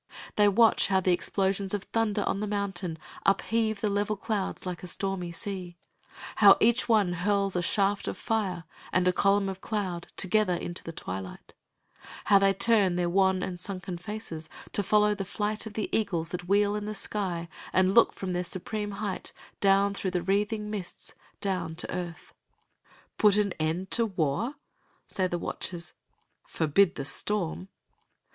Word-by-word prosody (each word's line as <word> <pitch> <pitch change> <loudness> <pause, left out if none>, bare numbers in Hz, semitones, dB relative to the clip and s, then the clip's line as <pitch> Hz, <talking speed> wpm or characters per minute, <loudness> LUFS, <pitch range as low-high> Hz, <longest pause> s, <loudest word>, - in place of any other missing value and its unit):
They 210 -1 +5
watch 225 +2 +5
how 190 -1 +3
the 185 0 +2
explosions 195 +2 0
of 200 - -4
thunder 215 -2 0
on - - -1
the 210 - -2
mountain 190 -5 -2 0.3
upheave 220 +1 +1
the 215 - +1
level 205 +1 0
clouds 205 -2 -3
like 180 -2 -4
a 180 - -7
stormy 185 -1 -3
sea, 180 -1 -6 0.6
how 200 -2 +8
each 235 +2 +3
one 205 -6 +4
hurls 195 +2 0
a 180 - +1
shaft 200 +3 +1
of - - -3
fire 200 -7 -1 0.3
and 185 0 +2
a 180 - +4
column 195 +1 +3
of 190 -1 -5
cloud 190 -6 -3
together 195 -1 +2
into 175 0 -5
the 165 - -6
twilight; 95 - -7 0.8
and 200 -1 +7
they 195 0 +5
turn 195 -2 +4
their 175 -1 0
wan 190 0 +3
and 180 -1 -4
sunken 185 -1 -5
faces 180 -5 -6 0.2
to - - +2
follow 210 +1 +3
the 200 -1 -3
flight 210 +3 -2
of 215 - -9
the 215 0 -2
eagles 175 -7 0
that 175 0 -5
wheel 205 +1 +3
in 210 0 -3
the 215 0 -4
sky 180 -6 -2 0.2
and 185 +1 +3
look 235 - +6
from 185 -2 -4
their 180 0 0
supreme 205 +4 -3
height 200 -1 -4 0.3
down 200 0 +4
through 195 -1 -2
the 180 -1 -2
wreathing 210 +3 0
mists, 195 -5 -5 0.3
down 185 -5 -2
to 170 - -4
earth. 175 -2 -6 0.9
"Put 210 -1 +5
an 205 -3 +1
end 165 +5 -1
to 230 -1 +3
war?" 190 - -1 0.5
say 185 -1 -1
the 175 - -2
watchers. 170 0 -5 0.5
"Forbid 170 +4 +2
the 135 - -4
Storm!" 185 +2 -1
195 Hz, 170 wpm, -28 LUFS, 180-210 Hz, 0.9 s, how